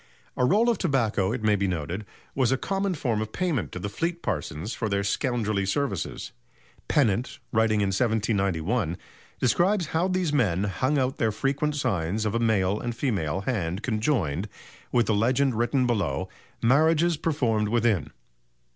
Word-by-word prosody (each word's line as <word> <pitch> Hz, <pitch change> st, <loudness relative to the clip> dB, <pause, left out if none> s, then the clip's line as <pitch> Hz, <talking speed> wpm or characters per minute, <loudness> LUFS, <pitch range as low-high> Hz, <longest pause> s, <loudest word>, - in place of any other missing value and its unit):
A 125 Hz, -, +2 dB
roll 210 Hz, -, +3 dB
of 235 Hz, -3 st, +2 dB
tobacco, 115 Hz, -, +1 dB
it 125 Hz, -, -3 dB
may 105 Hz, -1 st, +4 dB
be 100 Hz, -1 st, 0 dB
noted, 90 Hz, +4 st, -3 dB, 0.3 s
was 130 Hz, -2 st, +2 dB
a 135 Hz, -, +2 dB
common 195 Hz, +4 st, -1 dB
form 120 Hz, -8 st, -1 dB
of 110 Hz, 0 st, -4 dB
payment 165 Hz, -, -1 dB
to -, -, -6 dB
the 90 Hz, -, -3 dB
Fleet 170 Hz, +11 st, -3 dB
parsons 80 Hz, +10 st, -3 dB
for 110 Hz, -, -2 dB
their 100 Hz, 0 st, 0 dB
scoundrelly 110 Hz, -2 st, 0 dB
services. 100 Hz, -, -2 dB, 0.6 s
Pennant, 120 Hz, -4 st, +1 dB
writing 110 Hz, -1 st, +2 dB
in 100 Hz, -, +1 dB
1791, 100 Hz, -4 st, 0 dB, 0.4 s
describes 175 Hz, -, +2 dB
how 165 Hz, +3 st, +2 dB
these 185 Hz, -4 st, 0 dB
men 100 Hz, -, +2 dB
hung 130 Hz, +9 st, 0 dB
out 130 Hz, -1 st, 0 dB
their 110 Hz, -1 st, +1 dB
frequent 140 Hz, +6 st, -1 dB
signs 105 Hz, -, -1 dB
of 105 Hz, -, 0 dB
a 115 Hz, -, +1 dB
male 105 Hz, -3 st, +2 dB
and 120 Hz, -1 st, -4 dB
female 95 Hz, -, -1 dB
hand 95 Hz, -4 st, -2 dB
conjoined, 105 Hz, -, 0 dB, 0.4 s
with 120 Hz, -2 st, +3 dB
the 110 Hz, -, +1 dB
legend 125 Hz, +5 st, +2 dB
written 120 Hz, +3 st, +1 dB
below: 100 Hz, -, 0 dB, 0.4 s
"Marriages 160 Hz, +7 st, +4 dB
performed 125 Hz, -10 st, 0 dB
within." 115 Hz, -4 st, +1 dB
115 Hz, 160 wpm, -26 LUFS, 100-140 Hz, 0.6 s, may